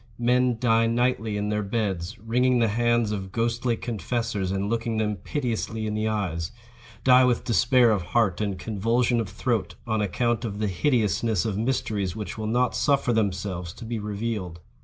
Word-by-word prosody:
Men 125 0 +2
die 115 -1 +3
nightly 115 -2 0
in 105 0 -2
their 105 0 0
beds, 100 -3 -2
wringing 125 +4 +2
the 115 -2 +3
hands 120 0 +2
of 95 -3 -4
ghostly 115 +1 0
confessors 115 -3 -2
and 95 +1 -1
looking 115 0 -1
them 105 -2 0
piteously 115 - -3
in 105 - -2
the 110 +1 -1
eyes—die 115 +6 0
with 125 -2 +2
despair 120 +3 +4
of 105 -3 +1
heart 100 +1 +1
and 100 -3 -1
convulsion 115 +5 +1
of 105 - -5
throat, 110 +2 -2
on 110 -2 0
account 120 +3 0
of 105 -3 -4
the 105 -1 -1
hideousness 110 - +1
of 105 - -1
mysteries 105 -5 -1
which 105 -4 -5
will 110 -1 -4
not 125 +3 +1
suffer 140 -4 +2
themselves 95 -5 -1
to 120 - -10
be 115 0 -3
revealed. 105 -4 -4
110 Hz, 170 wpm, -25 LUFS, 100-120 Hz, -, despair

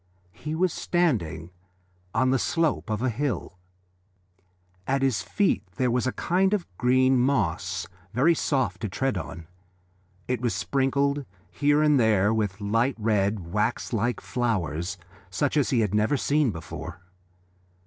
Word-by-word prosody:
He 155 +1 -5
was 180 +1 +1
standing 100 - 0 0.6
on 130 +5 +2
the 135 - +2
slope 165 -6 0
of 110 +2 -1
a 130 - +2
hill. 115 -7 -3 1.3
At 135 0 +1
his 130 -6 +2
feet 200 - +1
there 125 +5 +1
was 125 +1 +1
a - - +1
kind 190 +8 +1
of 190 - -3
green 130 +1 +4
moss, 120 -11 0 0.3
very 140 +9 +4
soft 130 - -1
to 110 - -2
tread 135 +7 -1
on. 80 0 -6 0.8
It 125 -2 -1
was 120 -2 0
sprinkled 140 +1 +1 0.3
here 145 +8 +2
and 150 -3 +4
there 110 -2 +3
with 105 -3 -1
light 115 +6 +1
red, 105 -5 0
wax 105 +4 -1
like 115 +2 0
flowers 95 - -2 0.3
such 130 +11 0
as 145 -3 +2
he 125 -5 +2
had 105 -3 0
never 105 +7 +2
seen 145 0 +2
before. 85 -1 -7
125 Hz, 145 wpm, -26 LUFS, 105-140 Hz, 1.3 s, green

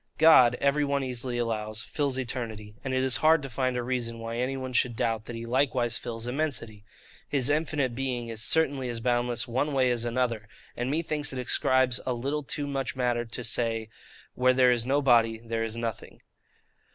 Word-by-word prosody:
God, 135 -7 +7
every 140 +1 +2
one 140 -1 0
easily 125 -1 -3
allows, 110 -2 -2
fills 140 -3 -1
eternity; 115 -5 -4
and 135 - -3
it 130 0 +1
is 130 -1 +3
hard 155 -1 +4
to 135 - -6
find 130 +1 -1
a 120 - -1
reason 120 -2 -2
why 115 0 -5
any 130 +2 -1
one 130 -1 -5
should 120 0 +2
doubt 110 -1 -1
that 120 - -7
He 115 0 -6
likewise 125 -1 +1
fills 115 -1 -5
immensity. 125 -6 -3 0.5
His 140 -1 +1
infinite 150 -4 0
being 125 -2 -3
is 110 -1 -4
certainly 140 -3 +1
as 120 -1 -4
boundless 120 0 0
one 130 +5 -1
way 130 -2 +3
as 120 -1 -1
another; 120 -3 -1 0.3
and 120 +1 -2
methinks 150 -1 -1
it - - -5
ascribes 125 0 +2
a 130 - -1
little 140 +5 -2
too 145 +1 -4
much 135 -2 -2
to - - -18
matter 120 -2 0
to 120 +2 -4
say, 115 -1 0 0.4
where 130 0 +3
there 125 -1 +5
is 120 -1 0
no 140 +2 +2
body, 115 -3 +4
there 115 0 -3
is 115 0 -4
nothing. 115 -2 -5
125 Hz, 200 wpm, -28 LUFS, 115-135 Hz, 0.5 s, God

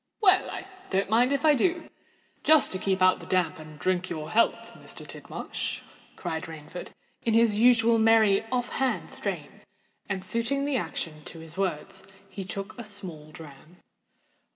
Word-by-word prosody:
"Well—I 385 -1 +3 0.2
don't 195 +1 0
mind 245 +4 +4
if 280 +1 +1
I 305 - +7
do—just 315 0 0
to 185 - -2
keep 190 -1 +1
out 185 0 +5
the - - -11
damp, 180 -4 +1
and 155 -1 -11
drink 185 +3 0
your 155 -2 -5
health, 230 - +2
Mr. - - -10
Tidmarsh," - - -5 0.3
cried 160 0 -4
Rainford, 160 +2 -8 0.4
in 225 -1 +2
his 225 -2 +4
usual 230 -1 +5
merry, 220 -3 +5
off 245 0 -1
hand 265 -1 0
strain; - - -5 0.5
and, 190 -2 -2
suiting 235 +7 0
the 285 -1 0
action 160 -9 -3
to - - -9
his 160 0 -9
words, 190 +1 -3 0.2
he 195 +1 -5
took 195 +1 -6
a - - -5
small 185 -8 -6
dram. 155 +2 -13
195 Hz, 155 wpm, -27 LUFS, 170-235 Hz, 0.5 s, I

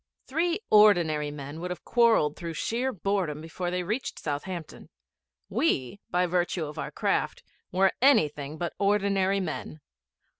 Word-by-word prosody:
Three 335 +6 0
ordinary 175 -8 +5
men 145 +1 -7
would 180 +2 -4
have 180 - -6
quarrelled 225 - +3
through 170 -2 -6
sheer 245 +9 -1
boredom 190 - -1
before 165 +3 -4
they 180 0 -2
reached 215 +8 -3
Southampton. 160 +3 -5 0.6
We, 195 - 0
by 180 +1 +2
virtue 175 -1 0
of 150 0 -8
our - - -3
craft, - - -1 0.3
were 190 +1 +3
anything 150 - +3
but 175 0 -3
ordinary 200 -1 +2
men. 160 -3 -5
180 Hz, 140 wpm, -27 LUFS, 155-205 Hz, 0.6 s, ordinary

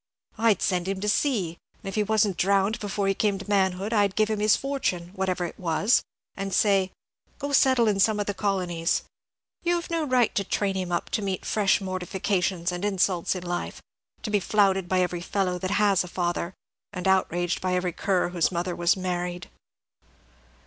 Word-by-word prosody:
I'd 225 -4 +3
send 180 -1 0
him 195 0 -2
to 210 - -2
sea, 205 - 0 0.2
and - - -8
if 195 - -4
he 215 - +1
wasn't 210 -2 +2
drowned 200 +3 +2
before 200 -1 -2
he 195 - +3
came 200 0 0
to 195 - -9
manhood, 195 +1 +1
I'd 205 -3 +2
give 215 0 +2
him 215 - -1
his 210 0 +4
fortune, 260 -11 -2
whatever 185 -2 -1
it 170 - -8
was, 185 +7 +2 0.3
and 195 0 -4
say, 195 -3 +3 0.5
'Go 285 0 -4
settle 260 -4 +4
in 205 -2 +1
some 210 +2 +3
of 205 - 0
the 205 - -2
colonies.' 180 -5 -1 0.6
You 350 0 +1
have 345 0 -4
no 330 -1 0
right 250 -3 +2
to 200 - 0
train 195 0 -1
him 185 -2 -3
up 175 - -2
to - - 0
meet 195 -2 -3
fresh 205 -3 +2
mortifications 185 -1 -1
and 175 +1 -5
insults 190 -3 +1
in 180 - -5
life; 175 0 -4 0.4
to 215 - -3
be 205 - +3
flouted 195 -2 +2
by 185 -1 +2
every 180 -1 -1
fellow 180 0 -1
that 185 - -3
has 200 -3 +3
a - - -8
father, 175 0 -2 0.4
and 180 -1 -4
outraged 175 -2 +1
by 185 -1 0
every 180 -1 -1
cur 185 -1 0
whose 175 0 +1
mother 175 0 -2
was 175 +2 +2
married." 180 -1 -3
190 Hz, 195 wpm, -26 LUFS, 180-210 Hz, 0.6 s, his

